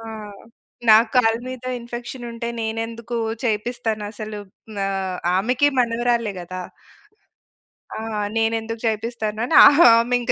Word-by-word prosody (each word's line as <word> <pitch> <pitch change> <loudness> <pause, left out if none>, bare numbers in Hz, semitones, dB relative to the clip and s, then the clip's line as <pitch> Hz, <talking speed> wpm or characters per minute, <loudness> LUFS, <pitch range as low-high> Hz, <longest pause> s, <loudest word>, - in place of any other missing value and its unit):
ఆ! - - -11 0.9
నా 215 - +9 0.2
కాళ్ళ 225 -3 +4
మీద 255 -1 -8 0.2
ఇన్ఫెక్షనుంటే 240 0 -7
నేనెందుకూ 225 +1 -4 0.3
చేపిస్తానసలు. 215 -1 -3 0.5
ఆహ్, 190 -2 -3 0.2
ఆమెకి 250 +8 +2
మనవరాలే 235 -2 0
గదా! 185 +1 -7 1.3
ఆ! - - -5 0.4
నేనెందుకు 225 0 -1
చేపిస్తాను 220 -1 -2
అని - - 0 0.4
ఆమి 235 +2 +2
ఇంక 240 - -1
225 Hz, 100 wpm, -21 LUFS, 215-240 Hz, 1.3 s, నా